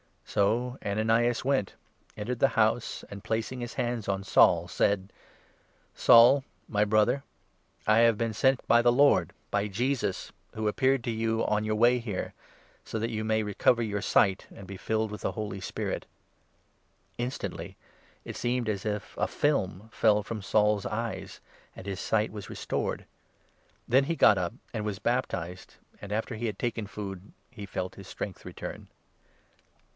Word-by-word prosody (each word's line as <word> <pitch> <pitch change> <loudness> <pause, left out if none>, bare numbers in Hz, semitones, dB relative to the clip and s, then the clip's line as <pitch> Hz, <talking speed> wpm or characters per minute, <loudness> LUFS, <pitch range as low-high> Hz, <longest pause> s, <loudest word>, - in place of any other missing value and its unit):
So 120 +6 0
Ananias 115 +3 +1
went, 130 -7 0 0.4
entered 120 +3 -4
the 135 - +5
house, 110 +1 +1
and, 100 -1 -8
placing 115 +3 -2
his 120 -1 -5
hands 120 -4 -2
17 100 - +1
on 95 0 -4
Saul, 85 -2 +4
said: 100 +1 +1 0.4
" - - -37
Saul, 120 +4 +7 0.3
my 105 -1 +2
Brother, 110 +6 +2 0.6
I 110 +1 +5
have 115 -2 +5
been 115 0 -1
sent 130 +4 +2
by 120 - +5
the 120 0 +4
Lord 120 - +4
— - - -40
by 100 0 +1
Jesus, 115 -1 -1 0.2
who 110 0 -2
appeared 130 +3 +2
to 120 - -1
you 115 0 0
on 105 0 +1
your 110 0 0
way 120 +3 +4
here 105 -6 -4 0.3
— - - -32
so - - -4
that 115 +2 -2
you 110 -1 -3
may 110 0 +1
recover 115 +3 +2
your 105 -2 -2
sight 95 -2 +2
and 100 - -10
be 95 +1 -8
filled 110 +2 -1
with 105 - -7
the - - -2
Holy 105 -3 -4
Spirit." 95 - -4 1.1
Instantly 120 +2 -4 0.5
it - - -7
seemed 120 -1 -1
as 100 -2 -2
if 105 -2 -3
a - - +1
film 110 -8 -1
fell 105 -2 +3
from 110 0 -5
Saul's 105 0 +2
eyes, 115 +2 -4 0.3
and - - -10
his 100 -2 -4
18 - - -5
sight 110 0 +1
was 105 -2 -8
restored. - - -3 0.8
Then 130 +3 +4
he 165 - -1
got 105 - +6
up 90 +2 -1 0.2
and 110 -2 -3
was 105 -2 -2
baptized, 95 -6 -2 0.3
and, 100 - -8
19 105 - +1
after 110 +1 -3
he 115 +2 -4
had 105 -3 -4
taken 115 -3 -2
food, 95 -1 -7 0.2
he 105 -5 -8
felt 95 -1 -4
his 95 -1 -11
strength 95 -1 -6
return. - - -7
110 Hz, 175 wpm, -28 LUFS, 100-120 Hz, 1.1 s, Saul